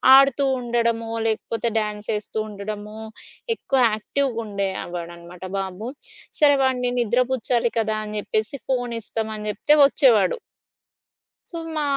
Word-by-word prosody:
ఆడుతూ 275 Hz, 0 st, +5 dB, 0.2 s
ఉండడమో, 235 Hz, -1 st, 0 dB, 0.2 s
లేకపోతే 225 Hz, +1 st, -1 dB
డ్యాన్స్ 210 Hz, -1 st, -2 dB
చేస్తూ 210 Hz, +1 st, -4 dB
ఉండడమో 210 Hz, +1 st, -6 dB, 0.6 s
ఎక్కువ 270 Hz, -9 st, 0 dB
యాక్టివ్‌గా 245 Hz, +3 st, -1 dB
ఉండేవాడనమాట 180 Hz, -3 st, -5 dB, 0.2 s
బాబు. 195 Hz, +4 st, -5 dB, 0.5 s
సరే 290 Hz, -2 st, +6 dB
వాడిని 250 Hz, -2 st, +1 dB
నిద్ర 240 Hz, +2 st, +2 dB
పుచ్చాలి 235 Hz, -1 st, +1 dB
కదా! 215 Hz, -1 st, 0 dB
అని 210 Hz, 0 st, -5 dB
జెప్పేసి 215 Hz, +6 st, -2 dB
ఫోనిస్తాం 230 Hz, -3 st, -2 dB
అని 210 Hz, 0 st, -6 dB
చెప్తే 255 Hz, +8 st, +2 dB
వచ్చేవాడు. 230 Hz, -9 st, +4 dB, 1.1 s
సో, 340 Hz, -, -6 dB, 0.2 s
మా 305 Hz, -, 0 dB
220 Hz, 115 wpm, -23 LUFS, 210-245 Hz, 1.1 s, సరే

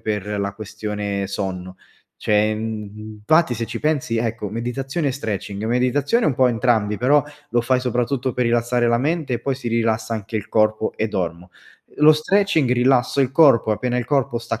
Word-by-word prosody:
per 105 Hz, -1 st, -3 dB
la 100 Hz, 0 st, -2 dB
questione 105 Hz, -2 st, -4 dB
sonno. 95 Hz, -2 st, -5 dB, 0.4 s
Cioè, 105 Hz, +1 st, +1 dB
mhmm, 110 Hz, -1 st, -6 dB
infatti 155 Hz, +3 st, +3 dB
se 115 Hz, 0 st, -3 dB
ci 115 Hz, -, -5 dB
pensi 145 Hz, -7 st, 0 dB
ecco, 115 Hz, -2 st, -2 dB
meditazione 135 Hz, +7 st, -3 dB
e -, -, -1 dB
stretching, 105 Hz, -4 st, -4 dB
meditazione 130 Hz, -, +1 dB
è -, -, +3 dB
un 140 Hz, -, +1 dB
po’ 130 Hz, 0 st, +4 dB
entrambi, 110 Hz, -3 st, +1 dB
però 145 Hz, +4 st, +4 dB, 0.3 s
lo 120 Hz, -, +2 dB
fai 130 Hz, +1 st, +2 dB
soprattutto 125 Hz, +1 st, -1 dB
per 125 Hz, -, -1 dB
rilassare 120 Hz, +1 st, +1 dB
la 115 Hz, 0 st, +2 dB
mente 150 Hz, -1 st, -1 dB
e -, -, -2 dB
poi 135 Hz, +2 st, -1 dB
si 125 Hz, -2 st, -5 dB
rilassa 115 Hz, -1 st, 0 dB
anche 110 Hz, 0 st, -7 dB
il 105 Hz, -, -5 dB
corpo 110 Hz, 0 st, +1 dB
e 110 Hz, -, 0 dB
dormo. 90 Hz, -3 st, -4 dB, 0.5 s
Lo 150 Hz, +1 st, +7 dB
stretching, 160 Hz, -3 st, +1 dB
rilasso 125 Hz, +2 st, +2 dB
il 135 Hz, 0 st, +1 dB
corpo, 135 Hz, -8 st, +5 dB
appena 125 Hz, +3 st, -2 dB
il 125 Hz, -, -1 dB
corpo 130 Hz, -3 st, 0 dB
sta 115 Hz, +1 st, -4 dB
115 Hz, 185 wpm, -21 LUFS, 105-130 Hz, 0.5 s, Lo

